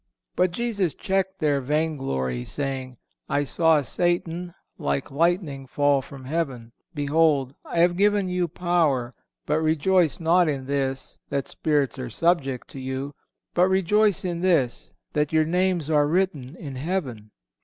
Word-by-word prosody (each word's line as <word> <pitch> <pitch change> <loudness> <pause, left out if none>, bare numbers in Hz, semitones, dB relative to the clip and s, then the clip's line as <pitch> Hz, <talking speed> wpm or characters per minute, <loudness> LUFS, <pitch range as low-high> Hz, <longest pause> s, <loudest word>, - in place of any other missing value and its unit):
But 180 0 +3
Jesus 200 -4 -1
checked 190 0 -1
their 145 -4 +1
vain 155 +4 0
glory, 65 - -2
saying: 130 - -4 0.3
"I 145 +1 +1
saw 160 +1 +3
Satan 175 +4 -1 0.2
like 70 - -2
lightning 155 -3 0
fall 145 +1 +2
from 135 0 -11
heaven. 130 -6 -3 0.2
Behold, 145 -2 +2
I 170 - 0
have 175 0 +4
given 205 0 +2
you 180 -1 0
power... 160 -8 0 0.3
but 150 +1 +1
rejoice 160 +2 +2
not 170 +1 +3
in 135 -3 -3
this, 135 -1 -3
that 140 -1 -2
spirits 145 -4 0
are 125 -1 -4
subject 135 -2 0
to 135 - -9
you; 130 +2 -4 0.4
but 180 +1 +4
rejoice 195 +1 +2
in 175 -1 -2
this, 165 -10 +1 0.2
that 150 -1 +1
your 160 -1 +3
names 180 -1 +1
are 150 -2 +3
written 160 -5 -1
in 140 -7 -7
heaven." 130 - -3
155 Hz, 145 wpm, -25 LUFS, 135-175 Hz, 0.4 s, have